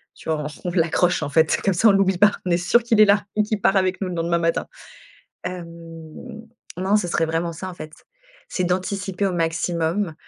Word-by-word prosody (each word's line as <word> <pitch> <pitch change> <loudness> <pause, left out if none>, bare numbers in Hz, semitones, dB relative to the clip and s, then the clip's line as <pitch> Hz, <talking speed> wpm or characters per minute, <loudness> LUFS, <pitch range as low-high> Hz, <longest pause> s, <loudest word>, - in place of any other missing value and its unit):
tu - - -10
vois. 155 -1 -1
On 150 +4 -6
on - - -3
l'accroche 170 +1 +1
en - - -3
fait, 160 +2 +3
comme 195 - +2
ça, 200 +6 +3
on - - +8
l'oublie 195 -1 +2
pas. 205 +3 +5
On 180 - -1
est 170 - +3
sûr 190 +7 +2
qu'il 230 -2 +1
est - - +9
là 200 0 +3
et 210 - +3
qu'il 215 0 -2
part 195 - +3
avec 185 -1 0
nous 190 - -1
le 180 - -5
lendemain 170 0 0
matin. 165 0 0 0.8
Hem, 180 -1 -5 1.1
non, 190 +3 +1
ce 195 -4 -2
serait 170 -1 +1
vraiment 165 +1 -2
ça, 185 +4 -6
en - - -8
fait. 155 -3 -10 0.6
C'est 185 - -2
d'anticiper 190 +2 -2
au 185 - -2
maximum 165 +2 -1
180 Hz, 220 wpm, -22 LUFS, 165-195 Hz, 1.1 s, est